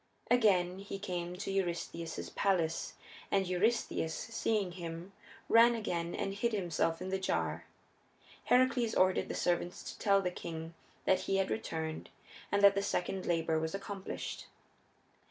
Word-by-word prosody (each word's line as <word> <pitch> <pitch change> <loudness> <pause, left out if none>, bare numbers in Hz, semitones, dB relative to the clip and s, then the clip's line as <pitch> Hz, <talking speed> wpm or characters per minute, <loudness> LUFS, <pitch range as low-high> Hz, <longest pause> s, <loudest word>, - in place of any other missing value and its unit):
Again 190 -6 +4
he 195 0 -6
came 180 -3 -4
to 195 +1 -4
Eurystheus's 170 -3 -3
palace, 170 -5 0 0.4
and 195 -1 +2
Eurystheus, 185 -3 0
seeing 220 -3 -1
him, 175 +1 -7 0.3
ran 235 +1 +7
again 175 -6 -2
and 195 - -2
hid 230 +3 0
himself 170 -3 0
in 185 - -4
the 190 0 -1
jar. 190 - -1 0.8
Heracles 250 -2 +3
ordered 185 0 +3
the - - -3
servants 175 0 0
to - - -16
tell 200 -2 +4
the 180 -2 -1
king 165 -1 -6 0.3
that 190 - +4
he 195 - +3
had 195 -1 +1
returned 160 -7 -3 0.4
and 200 0 +2
that 200 0 +9
the 200 - 0
second 190 -1 -2
labor 165 -2 +1
was 160 +3 -2
accomplished. 195 -1 -5
190 Hz, 145 wpm, -33 LUFS, 170-200 Hz, 0.8 s, that